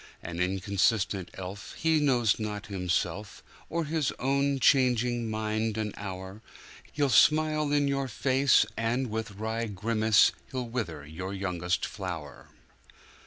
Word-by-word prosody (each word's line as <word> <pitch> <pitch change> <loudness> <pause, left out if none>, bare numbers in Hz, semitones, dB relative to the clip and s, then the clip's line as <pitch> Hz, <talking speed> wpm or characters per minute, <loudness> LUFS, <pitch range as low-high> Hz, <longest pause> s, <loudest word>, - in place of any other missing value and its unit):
An 85 0 -6
inconstant 95 +1 0
elf, 95 +2 -7
he 160 -1 +2
knows 120 -8 +2
not 105 -1 -4
himself, 95 +1 -2 0.3
Or 170 0 -1
his 155 -2 0
own 140 +1 +1
changing 125 -3 +3
mind 110 0 -1
an 105 -2 -2
hour, 95 +1 -7 0.5
He'll 145 -1 +1
smile 155 +4 +4
in 145 -1 +2
your 140 -1 0
face, 130 0 +3
and, 115 +2 -1
with 110 +1 -3
wry 110 +3 -3
grimace, 110 +1 +3 0.2
He'll 130 -2 -3
wither 90 -12 -4
your 90 +6 -6
youngest 90 -2 -1
flower. 85 -8 -7
110 Hz, 125 wpm, -28 LUFS, 95-130 Hz, 0.5 s, smile